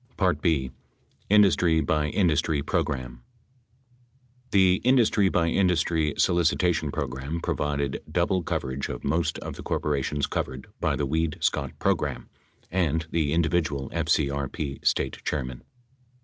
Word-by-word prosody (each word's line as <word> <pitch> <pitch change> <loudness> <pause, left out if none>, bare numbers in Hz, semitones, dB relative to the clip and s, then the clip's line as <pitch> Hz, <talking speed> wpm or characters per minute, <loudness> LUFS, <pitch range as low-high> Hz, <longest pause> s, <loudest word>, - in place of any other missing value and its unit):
B. 70 -6 +1 0.6
Industry 95 -5 +4
by 75 -1 +1
Industry 75 -4 +1
Program 65 -5 -2 1.3
The 95 -2 +4
industry 115 -6 +4
by 85 -2 +1
industry 80 -4 +1
solicitation 85 -2 +2
program 70 +6 -4
provided 70 -3 -2
double 95 -1 +1
cov - - -2
erage 65 +1 -4
of 60 - -6
most 80 +4 0
of - - -7
the - - -7
corporations 75 -1 -1
covered 65 +1 -4
by - - +1
the 70 - -1
Weed 80 +3 -1
Scott 70 -1 -1
program - - -1 0.4
and 80 -3 0
the 80 -3 0
individual 80 -4 0
FCRP 70 0 -1
State - - 0
chairmen. 65 -4 -3
75 Hz, 120 wpm, -26 LUFS, 70-85 Hz, 1.3 s, Industry